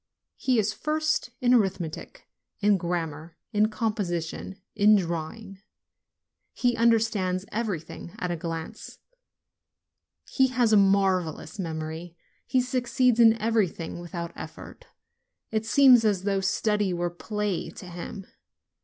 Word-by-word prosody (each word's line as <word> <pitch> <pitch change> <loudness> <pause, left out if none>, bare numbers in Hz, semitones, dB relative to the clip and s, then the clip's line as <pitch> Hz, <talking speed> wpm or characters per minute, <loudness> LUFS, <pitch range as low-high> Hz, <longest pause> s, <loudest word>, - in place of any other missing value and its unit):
He 255 -2 +1
is 215 -1 +1
first 310 +1 -1
in 250 0 +4
arithmetic, 190 -8 -1 0.3
in 205 0 +4
grammar, 165 -2 -4 0.2
in 210 +1 +3
composition, 195 -4 -3 0.2
in 210 0 +6
drawing; 190 +3 -3 0.9
he 245 -1 +1
understands 215 -5 +2
everything 200 -7 -4
at 180 - -3
a - - -1
glance; 165 -1 -6 1.3
he 265 -1 +3
has 245 -3 +2
a - - +8
marvelous 195 -4 +2
memory; 160 0 -5 0.3
he 255 0 +2
succeeds 250 -1 +1
in 225 -1 +6
everything 205 -7 -1
with 175 +1 -9
out 170 0 -4
effort. - - -10 0.6
It 220 0 -1
seems 255 -2 +6
as 200 -4 +1
though 195 -1 0
study 205 0 +1
were 175 0 -1
play 210 +1 -3
to 200 - -11
him. 180 +3 -8
200 Hz, 120 wpm, -26 LUFS, 175-225 Hz, 1.3 s, a